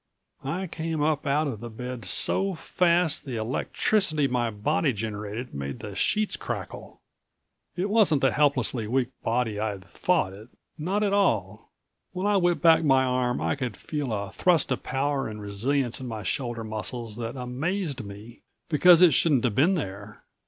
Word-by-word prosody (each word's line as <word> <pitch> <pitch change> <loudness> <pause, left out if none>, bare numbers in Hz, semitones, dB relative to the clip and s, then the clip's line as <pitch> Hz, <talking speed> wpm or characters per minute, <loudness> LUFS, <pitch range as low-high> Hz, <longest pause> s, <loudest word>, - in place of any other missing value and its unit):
I 170 +8 -2
came 160 -3 -3
up 150 -1 0
out 145 +3 +2
of 130 -8 -4
the 120 +1 -7
bed 125 0 -7
so 190 - +2
fast 170 -1 +2
the 130 -4 -5
electricity 150 - +1
my 120 -2 0
body 135 +7 0
generated 105 +2 -5
made 70 0 -5
the 105 - -7
sheets 215 - 0
crackle. - - -7 0.8
It 185 +2 -1
wasn't 205 -9 +3
the 135 - +3
helplessly 130 -6 +1
weak 125 +1 0
body 115 -2 -1
I'd 105 -3 -3
thought 155 - 0
it. 105 +3 -12 0.3
Not 185 +7 -1
at 200 -1 +1
all. 110 - 0 0.4
When 185 +2 -3
I 205 -1 +3
whipped 175 -2 +1
back 165 -1 +6
my 135 -3 +4
arm 125 -1 0
I - - 0
could 125 -7 -4
feel 145 -5 -4
a 100 -2 -3
thrust 175 - +2
of - - -1
power 140 0 -1
and 105 -1 -7
resilience 120 +6 -1
in 130 - -5
my 110 -3 -5
shoulder 120 +3 -3
muscles 110 +1 -5
that 115 +1 -4
amazed 140 - -3
me, 105 +3 -11 0.3
because 175 +2 +6
it 170 -5 +7
shouldn't 140 -4 +3
have 120 -4 +1
been 165 - +3
there. 100 - -6
130 Hz, 170 wpm, -26 LUFS, 110-160 Hz, 0.8 s, it